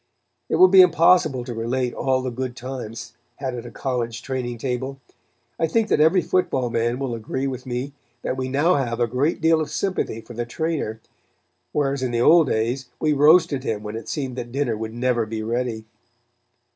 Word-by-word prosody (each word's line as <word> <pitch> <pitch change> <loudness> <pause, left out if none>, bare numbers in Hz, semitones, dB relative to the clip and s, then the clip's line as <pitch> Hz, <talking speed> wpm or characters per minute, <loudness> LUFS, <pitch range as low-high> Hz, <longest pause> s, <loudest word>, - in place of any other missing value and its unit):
It - - +1
will 185 - +8
be 190 0 +8
impossible 165 -6 +4
to 120 -1 -6
relate 120 +2 -1
all 130 -1 0
the 130 - -2
good 125 0 -4
times 115 -3 -7 0.2
had 135 -2 -4
at 120 -2 -6
a - - -7
college 120 -3 -3
training 125 -3 -3
table. 130 +2 -3 0.6
I 165 - +2
think 220 +6 +1
that - - +2
every 160 +4 +4
football 130 -9 0
man 120 +2 0
will 135 -2 -3
agree 115 +4 -3
with 130 -1 -5
me 125 +3 -3 0.3
that - - -1
we 130 0 -3
now 145 +7 +3
have 120 -4 -2
a 120 - +3
great 135 +9 -1
deal 160 0 +4
of 150 - -3
sympathy 185 - -2
for 120 - -11
the 120 +1 -3
trainer, 130 -3 -3 0.7
whereas 140 -2 0
in 130 - 0
the 120 -1 -1
old 160 +5 +6
days 120 +3 -1
we 155 -1 +2
roasted 150 -2 +4
him 105 -5 -3
when 105 0 -6
it 115 - -7
seemed 135 -5 -3
that 120 -1 -5
dinner 135 -3 0
would 110 +1 -5
never 120 -2 0
be 110 0 -4
ready. 115 -1 -2
130 Hz, 195 wpm, -23 LUFS, 120-145 Hz, 0.7 s, will